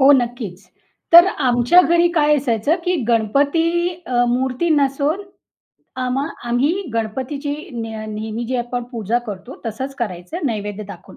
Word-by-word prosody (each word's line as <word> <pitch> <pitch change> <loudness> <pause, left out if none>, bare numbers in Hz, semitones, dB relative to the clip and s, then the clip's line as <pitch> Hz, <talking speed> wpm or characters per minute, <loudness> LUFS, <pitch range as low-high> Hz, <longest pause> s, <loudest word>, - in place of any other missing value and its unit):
हो 270 +1 +7
नक्कीच. 235 -7 -1 0.5
तर 345 +2 +10 0.2
आमच्या 245 +7 +5
घरी 345 0 +3
काय 300 -2 +3
असायचं, 260 +2 +1
की 360 - +1
गणपती 285 +10 +2 0.2
अ, 245 -1 +2
मूर्ती 260 +6 0
नसून 290 +4 +1 0.8
आम्हा 255 +2 -1 0.2
आम्ही 245 +5 +2 0.2
गणपतीची 265 +6 -3 0.2
न 235 -2 -4 0.3
नेहमी 220 +2 -4
जी 255 +1 -1
आपण 245 0 -3
पूजा 230 0 0
करतो, 205 +5 -8
तसंच 260 +5 -4
करायचं 235 - -4
नैवेद्य 210 -2 -3
दाखवून. 195 -4 -11
250 Hz, 135 wpm, -20 LUFS, 225-290 Hz, 0.8 s, तर